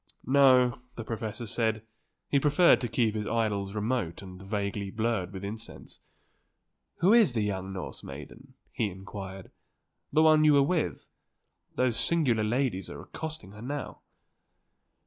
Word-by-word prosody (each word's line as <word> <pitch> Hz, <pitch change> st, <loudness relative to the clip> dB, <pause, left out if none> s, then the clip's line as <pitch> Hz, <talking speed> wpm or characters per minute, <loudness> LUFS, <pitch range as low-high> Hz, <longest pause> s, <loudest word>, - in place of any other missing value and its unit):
No, 130 Hz, -2 st, +5 dB
the 115 Hz, -, -5 dB
professor 110 Hz, 0 st, -5 dB
said, 110 Hz, 0 st, 0 dB, 0.4 s
he 140 Hz, -, +2 dB
preferred 150 Hz, +5 st, +5 dB
to 120 Hz, -, -1 dB
keep 115 Hz, -1 st, +1 dB
his 105 Hz, -1 st, -3 dB
idols 105 Hz, -3 st, -1 dB
remote 105 Hz, -5 st, -2 dB
and 90 Hz, -1 st, -10 dB
vaguely 100 Hz, 0 st, -3 dB
blurred 110 Hz, -3 st, -1 dB
with 95 Hz, 0 st, -7 dB
incense. 110 Hz, +3 st, -7 dB, 1.0 s
"Who 190 Hz, +5 st, +5 dB
is 220 Hz, -, +5 dB
the 110 Hz, -3 st, 0 dB
young 95 Hz, -2 st, -3 dB
Norse 95 Hz, -2 st, -7 dB
maiden?" 115 Hz, -, -11 dB, 0.2 s
he 110 Hz, -4 st, -1 dB
inquired; 95 Hz, 0 st, -9 dB, 0.6 s
"the 155 Hz, -, +4 dB
one 155 Hz, -1 st, +6 dB
you 150 Hz, -1 st, +6 dB
were 140 Hz, -1 st, +6 dB
with. 165 Hz, +2 st, -1 dB, 0.7 s
Those 125 Hz, -3 st, +1 dB
singular 135 Hz, -10 st, +2 dB
ladies 115 Hz, -3 st, -1 dB
are -, -, -8 dB
accosting 160 Hz, -10 st, -6 dB
her 105 Hz, +1 st, -12 dB
now." 140 Hz, +3 st, -5 dB
115 Hz, 145 wpm, -29 LUFS, 100-135 Hz, 1.0 s, one